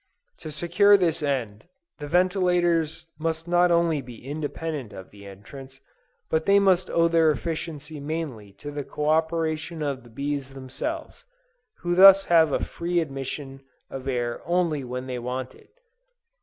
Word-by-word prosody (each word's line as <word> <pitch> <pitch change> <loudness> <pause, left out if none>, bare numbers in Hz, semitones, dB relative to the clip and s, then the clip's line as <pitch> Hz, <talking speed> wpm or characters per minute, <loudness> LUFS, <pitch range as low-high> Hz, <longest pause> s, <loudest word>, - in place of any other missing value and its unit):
To 155 - -7
secure 175 +7 +4
this 170 -4 0
end, 125 -5 -3 0.3
the 145 - -6
ventilators 175 -2 +1
must 165 +1 -2
not 175 +1 +4
only 170 -3 +2
be 120 -1 -12
independent 145 -3 -5
of 95 - -11
the 100 -1 -13
entrance, 130 +7 -12 0.5
but 160 0 -1
they 200 0 +6
must 190 -2 +3
owe 170 0 +3
their 165 -1 +4
efficiency 155 0 -4
mainly 140 -9 -5
to 145 +8 -9
the 145 0 -4
co 150 +2 -3
operation 160 0 0
of 140 -3 -3
the 120 - -16
bees 140 +2 -4
themselves, 300 - -6 0.6
who 175 0 -1
thus 195 +2 +8
have 165 -3 +4
a - - 0
free 175 +1 -2
admission 135 -2 -5 0.3
of 135 0 -7
air 120 -2 -2
only 170 -5 0
when 125 +1 -5
they 125 -1 -4
want 125 +1 -4
it. - - -20
155 Hz, 155 wpm, -25 LUFS, 135-170 Hz, 0.6 s, thus